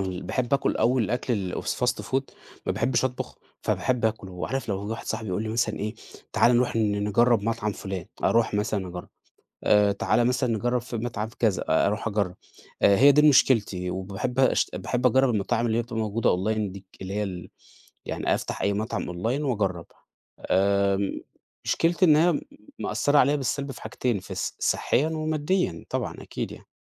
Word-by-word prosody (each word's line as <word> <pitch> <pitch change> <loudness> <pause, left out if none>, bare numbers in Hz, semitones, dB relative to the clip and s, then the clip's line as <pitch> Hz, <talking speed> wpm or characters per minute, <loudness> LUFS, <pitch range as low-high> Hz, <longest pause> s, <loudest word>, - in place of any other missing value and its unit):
ال 95 -1 -3
باحب 130 +1 0
أكُل 140 - +1
أوي 125 +1 +3
الأكل 110 -4 -1
الFast - - -1
food 135 +1 0 0.4
ما - - +1
باحبش 130 -1 +1
أطبُخ، 130 -1 -3 0.3
فباحب 125 -3 0
أكله، 95 -5 -2
عارف 135 -2 -3
لو 100 0 -2
واحد 115 +2 -5
صاحبي 110 - -3
يقول 95 +4 -1
لي 110 - -4
مثلًا 110 -1 0
إيه 105 +2 -3 0.4
تعالَ 120 0 +4
نروح 125 -1 +1
ن 105 -2 +1
نجرّب 115 +1 +3
مطعم 105 -1 -1
فُلان، 95 -2 -6 0.2
أروح 115 -2 +3
مثلًا 105 -2 -1
أجرّب، 90 0 -8 0.6
آآ 105 -1 +4
تعالَ 120 +4 +1
مثلًا 125 0 +1
نجرّب 120 +2 0
في 120 -1 -6
مطعم 110 -2 -3
كذا، 110 -5 +2
آآ - - +4
أروح 105 +3 -1
أجرب، 100 -4 -1 0.5
آآ 100 -1 +5
هي 140 +5 +8
دي 150 +2 +6
مشكلتي، 105 -9 +3
وباحب 100 +7 -3
أشت 130 - +2
باحب 125 0 -2
أجرب 130 +2 +3
المطاعم 115 +2 0
اللي 115 -1 +1
هي 120 - +2
بتبقى 115 -1 -7
موجودة 110 +1 +1
Online 105 +2 -1
دي، 100 0 -11 0.2
اللي 95 +1 -5
هي 105 +1 0
ال 90 -3 -6 0.6
يعني - - 0
أفتح - - -4
أي 100 - +2
مطعم 105 -3 -3
Online 115 +10 -1
وأجرّب، 100 - -1 0.6
آمم 100 +1 +2 0.4
مشكلتي 170 +2 +2
إن 155 -4 +6
هي 165 0 +3 0.4
مأثّرة 145 +1 +2
عليّا 140 +2 +4
بالسلب 140 0 -2
في - - -12
حاجتين، 120 -5 -1
في 95 - -8
ص - - -3
صحيًا 145 +5 +1
وماديًا 155 - -1
طبعًا - - -2
أكيد - - -5
يعني. - - -13
110 Hz, 175 wpm, -26 LUFS, 100-125 Hz, 0.6 s, هي